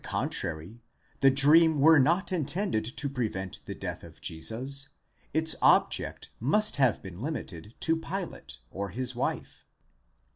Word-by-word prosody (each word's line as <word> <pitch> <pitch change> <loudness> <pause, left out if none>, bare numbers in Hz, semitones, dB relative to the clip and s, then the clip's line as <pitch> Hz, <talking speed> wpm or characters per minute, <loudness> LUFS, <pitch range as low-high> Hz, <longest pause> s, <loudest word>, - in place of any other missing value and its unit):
contrary, 85 +9 -4 0.4
the 135 - +6
dream 150 +3 +5
were 160 +2 +7
not 170 +9 +2
intended 170 - -1
to 125 +5 -3
prevent 110 -8 -3
the - - -5
death - - -6
of - - -14
Jesus, 130 +11 -3 0.4
its 160 +1 +4
object - - +2
must 210 - +2
have 130 -5 +2
been 95 0 -9
limited 110 - -6
to 165 - +2
Pilate 180 +3 -6
or 100 +1 -4
his 125 +5 -3
wife. 120 - -4
135 Hz, 135 wpm, -28 LUFS, 110-160 Hz, 0.4 s, were